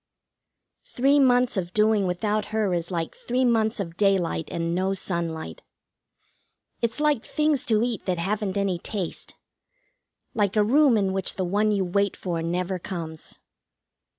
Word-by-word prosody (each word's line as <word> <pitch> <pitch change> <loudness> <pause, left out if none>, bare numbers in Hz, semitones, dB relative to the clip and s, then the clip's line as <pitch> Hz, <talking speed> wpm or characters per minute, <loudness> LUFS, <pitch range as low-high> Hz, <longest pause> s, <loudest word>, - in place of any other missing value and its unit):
Three 275 +3 +3
months 250 -3 +3
of 180 -1 -3
doing 210 -2 +3
without 210 +4 -1
her 215 -3 -1
is 170 -1 -1
like 165 -3 -3
three 255 +2 -1
months 225 -2 +1
of 170 -3 -5
daylight 190 -5 +1
and 170 0 -2
no 190 +2 0
sunlight. 170 -4 -4 1.2
It's 235 +3 -1
like 295 -6 +2
things 300 -3 0
to 220 -1 +3
eat 240 -5 -3
that 180 -1 0
haven't 200 +2 -2
any 195 -3 0
taste; 190 -2 -5 1.0
like 205 -2 0
a 210 - +4
room 265 +2 +4
in 195 -2 0
which 190 -1 -1
the 185 - -1
one 205 +4 +1
you 200 -2 +1
wait 200 +2 0
for 170 -3 -3
never 180 +2 -2
comes. 165 -4 -7
200 Hz, 150 wpm, -25 LUFS, 180-220 Hz, 1.2 s, a